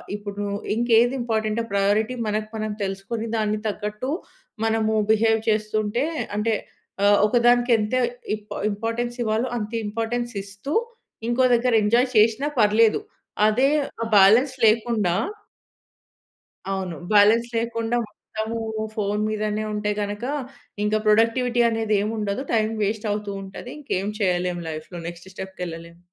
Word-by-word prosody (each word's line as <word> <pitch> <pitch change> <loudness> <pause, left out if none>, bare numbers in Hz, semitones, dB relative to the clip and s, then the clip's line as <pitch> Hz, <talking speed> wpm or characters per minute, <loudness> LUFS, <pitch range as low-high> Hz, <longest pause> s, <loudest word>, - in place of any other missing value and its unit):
ఇప్పుడు 205 -1 -7
నువ్వు 200 0 -3 0.2
ఇంకే 235 0 +3
ఏది 245 +2 +1
ఇంపార్టెంట్ 220 -1 0
ప్రయారిటీ 210 +4 +2
మనకు 215 0 -2
మనం 215 0 -2
తెలుసుకొని, 195 +4 -4
దానికి 215 0 0
తగ్గట్టు 210 +4 -3 0.6
మనము 220 -1 +1 0.2
బిహేవ్ 225 0 +3
చేస్తుంటే 215 +2 0 0.3
అంటే, 225 +1 +1 0.5
ఆహ్, 205 0 +5
ఒకదానికి 240 +1 +3
ఎంత 210 +2 -2 0.4
ఇంప్ 210 0 -10 0.2
ఇంపార్టెన్స్ 230 +3 -3
ఇవ్వాలో 225 +3 0
అంత 210 +1 -5
ఇంపార్టెన్స్ 230 +3 -2
ఇస్తూ, 200 +10 -6 0.6
ఇంకో 250 +2 +2
దగ్గర 240 0 +1
ఎంజాయ్ 240 +5 +3
చేషీనా 225 +7 +4
పర్లేదు. 215 - +4 0.5
అదే 255 +6 +3 0.3
ఆ - - 0
బాలన్స్ 225 +8 +6
లేకుండా 215 -4 +2 1.6
అవును. 185 -3 -3 0.2
బాలన్స్ 215 +3 +5
లేకుండా 230 0 -1
మొత్తము 220 +2 -6 0.4
ఫోన్ 210 0 -1
మీదనే 215 0 -1
ఉంటే 210 0 -1
గనుక, 205 +2 -4 0.6
ఇంకా 215 +1 +2
ప్రొడక్టివిటీ 230 +3 +3
అనేది 225 -2 0
ఏం 210 - -1
ఉండదు. 210 +4 -2
టైం 220 -1 +2
వేస్ట్ 215 +1 -1
అవుతూ 210 -1 -3
ఉంటది. 195 +6 -9
ఇంకేం 205 -9 -2
చేయలేం 180 -2 0
లైఫ్‌లో 155 +3 -7
నెక్స్ట్ 175 +2 -9
స్టెప్‌కి 190 -1 -7
ఎళ్ళలేము. 170 +1 -9
215 Hz, 130 wpm, -23 LUFS, 205-230 Hz, 1.6 s, బాలన్స్